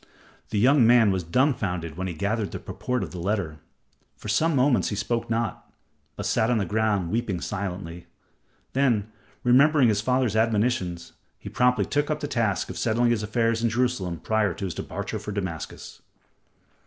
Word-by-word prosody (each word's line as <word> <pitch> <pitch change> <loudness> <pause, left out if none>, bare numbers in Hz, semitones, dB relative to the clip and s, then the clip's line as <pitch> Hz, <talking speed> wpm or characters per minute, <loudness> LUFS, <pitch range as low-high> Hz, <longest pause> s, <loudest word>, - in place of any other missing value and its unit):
The 105 - -2
young 125 +2 +5
man 115 -3 +6
was 95 -1 0
dumbfounded 90 - 0
when 95 +2 -3
he 85 - -5
gathered 100 +4 -1
the - - -4
purport 125 -4 -3
of - - -6
the 90 - -7
letter. 85 -4 -2 0.6
For 105 - -8
some 155 +9 +2
moments 130 -1 +3
he 105 - -3
spoke 115 +2 -2
not, 115 0 -2 0.4
but - - -5
sat 110 - +1
on 120 - +2
the 100 - 0
ground, 105 -3 0
weeping 110 -5 -1
silently. 90 -2 -5 0.7
Then, 115 -6 +1 0.3
remembering 135 +1 +5
his 105 -1 +1
father's 125 -2 +1
admonitions, 105 -6 0 0.2
he - - -9
promptly 125 -5 +2
took 145 +6 0
up 155 -1 -1
the 145 - -3
task 115 -8 0
of - - -6
settling 120 +1 +2
his 115 -3 +1
affairs 115 +2 0
in 115 - +2
Jerusalem 115 -7 -1
prior 105 -1 0
to 100 - -4
his 90 - -3
departure - - -5
for 105 - -6
Damascus. 95 -6 -6
110 Hz, 175 wpm, -25 LUFS, 95-120 Hz, 0.7 s, man